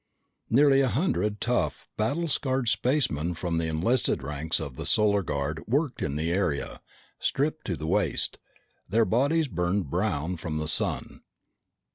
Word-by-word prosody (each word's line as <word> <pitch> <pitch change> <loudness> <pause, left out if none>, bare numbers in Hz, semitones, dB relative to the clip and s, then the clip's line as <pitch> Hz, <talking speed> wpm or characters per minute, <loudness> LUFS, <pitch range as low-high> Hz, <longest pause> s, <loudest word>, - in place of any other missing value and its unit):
Nearly 135 +2 +5
a 135 - +3
hundred 115 - 0
tough, 125 0 -1
battle 140 +11 0
scarred 130 -4 0
spacemen 110 - +1
from 85 -1 -1
the 80 - -1
enlisted 85 - 0
ranks 75 +3 -1
of 70 -5 -6
the - - -3
Solar 105 -1 +4
Guard 75 -1 -3
worked 140 +3 0
in 70 -1 -2
the 80 +3 -1
area, 90 -7 -1 0.4
stripped 150 +3 -1
to 90 -5 -2
the 75 - -5
waist, - - 0 0.5
their 110 +4 +3
bodies 145 +8 +2
burned 90 - -1
brown 90 -3 -1
from 80 -1 -4
the 75 0 -2
sun. 80 - 0
100 Hz, 150 wpm, -27 LUFS, 80-130 Hz, 0.5 s, Nearly